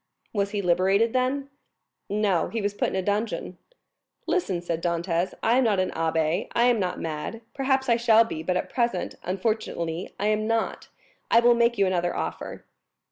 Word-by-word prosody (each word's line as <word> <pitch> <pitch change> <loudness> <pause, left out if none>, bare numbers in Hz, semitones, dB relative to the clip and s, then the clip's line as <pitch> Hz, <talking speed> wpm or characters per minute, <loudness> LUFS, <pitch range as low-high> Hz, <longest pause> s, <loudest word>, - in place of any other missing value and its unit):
"Was 200 -2 0
he 205 -1 -3
liberated, 190 +6 +3
then?" 270 +2 0 0.6
"No; 200 -4 +1
he 230 - -3
was 205 -1 -1
put - - 0
in - - -5
a 190 - 0
dungeon." 205 -3 -2 0.7
"Listen!" 200 - 0
said 170 -1 -3
Dantès. 170 +1 -1
"I 235 +3 +4
am - - +3
not 210 -5 +2
an 185 - 0
abbé, 160 +1 0
I 235 - +4
am 245 -2 +4
not 180 -2 -2
mad; 160 +8 -4
perhaps 265 -1 +1
I 235 -1 +4
shall 230 -1 +5
be, 190 -8 -5
but 180 +3 0
at - - -2
present, 235 -7 -1
unfortunately, 185 -4 -2
I 205 - -1
am 215 0 +1
not. 225 0 -1 0.4
I 230 - +6
will 240 0 +6
make 235 0 +2
you 200 - +4
another 175 -2 0
offer." - - -5
205 Hz, 185 wpm, -26 LUFS, 175-230 Hz, 0.7 s, I